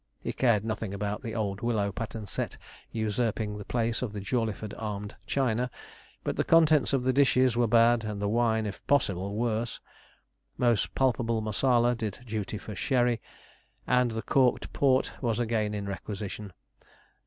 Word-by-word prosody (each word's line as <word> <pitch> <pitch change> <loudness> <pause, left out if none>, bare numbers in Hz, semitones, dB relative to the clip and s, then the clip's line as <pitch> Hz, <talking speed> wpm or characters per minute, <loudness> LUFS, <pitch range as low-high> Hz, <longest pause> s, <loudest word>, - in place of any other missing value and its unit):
He - - -4
cared 115 -5 +2
nothing 110 -2 -3
about 105 +2 -3
the 115 -4 -5
old 100 -3 -2
willow 110 -4 0
pattern 110 +1 -5
set - - -4 0.3
usurping 110 -1 -1
the 105 - -8
place 115 -1 0
of 120 -5 -3
the 105 - -4
Jawleyford 110 0 -2
armed 105 -2 -4
china; 125 -1 +1 0.5
but - - -2
the - - +2
contents 155 -3 +5
of 135 -3 +1
the 130 0 +2
dishes 130 -3 +4
were 120 0 +3
bad, 115 +1 +5
and 105 -2 -4
the 100 - -1
wine, 110 0 +2
if 100 - -6
possible, 100 -8 +1
worse. 115 0 -1 0.8
Most 120 -4 +1
palpable 120 -3 +1
Marsala 120 +3 +2
did 110 -4 -4
duty 110 -2 -3
for 105 - -8
sherry, 120 +1 +1 0.6
and 125 -1 +3
the 110 0 -4
corked 130 -3 +2
port 130 -2 +3
was 115 -4 0
again 110 -3 0
in 100 -1 -3
requisition. 100 +1 -5
115 Hz, 160 wpm, -28 LUFS, 105-120 Hz, 0.8 s, contents